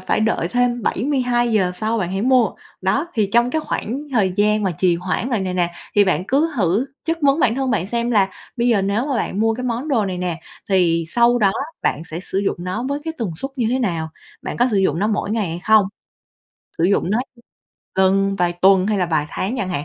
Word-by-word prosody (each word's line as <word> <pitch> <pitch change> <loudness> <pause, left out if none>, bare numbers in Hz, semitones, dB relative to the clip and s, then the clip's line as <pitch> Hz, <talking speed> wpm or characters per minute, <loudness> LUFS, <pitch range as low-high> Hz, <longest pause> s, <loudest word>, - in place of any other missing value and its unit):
phải - - 0
đợi 215 -6 0
thêm 245 0 0
72 245 -1 0
giờ 185 -4 +2
sau 220 +3 -1
bạn 180 -3 -2
hãy 195 +2 -1
mua. 250 -4 +4 0.3
Đó, 270 - 0
thì 210 -4 +1
trong 240 +1 +3
cái 315 +3 0
khoảng 265 -3 -3
thời 195 -6 +2
gian 210 +1 +2
mà 190 - +1
trì 180 -2 +3
hoãn 185 +7 -2
rồi 225 -5 0
này 185 -1 -2
nè, 175 -1 +1 0.2
thì 205 -1 +5
bạn 180 -1 0
cứ 300 +4 +2
thử 200 +6 +1 0.2
chất 330 0 -1
vấn 280 +3 +3
bản 235 -4 +3
thân 265 -1 -1
bạn 185 -5 0
xem 235 +2 -1
là 200 -4 +3 0.3
bây 240 +1 +1
giờ 210 -5 +3
nếu 205 +7 0
mà 270 -4 -1
bạn 210 -2 -2
mua 225 0 +2
cái 250 +2 -5
món 245 +5 -2
đồ 230 -7 +2
này 180 -1 -3
nè 175 -2 -3 0.3
thì 170 -4 +2
sau 240 +4 +3
đó 195 -3 +3 0.3
bạn 155 - 0
sẽ 165 +3 -4
sử 190 - -3
dụng 200 - 0
nó 185 +6 -3
với 285 +1 -1
cái 320 0 -4
tần 220 -7 -2
suất 270 +9 -5
như 235 -3 0
thế 260 - +1
nào? 170 -9 -1 0.3
Bạn - - -5
có 245 - +3
sử 205 - +1
dụng 180 -5 +2
nó 210 - +1
mỗi 210 -1 -1
ngày 215 -5 0
hay 170 +2 -5
không? 215 -2 +5 0.9
Sử 165 - +2
dụng 190 -1 +2
nó 220 - +2 0.8
lần, 195 +1 +3
vài 175 -1 +1
tuần 190 +2 +4
hay 210 -2 +1
là 180 - +1
vài 155 -3 0
tháng 220 +8 -2
chẳng 185 - -2
hạn. 150 -5 -3
210 Hz, 240 wpm, -20 LUFS, 185-240 Hz, 0.9 s, thì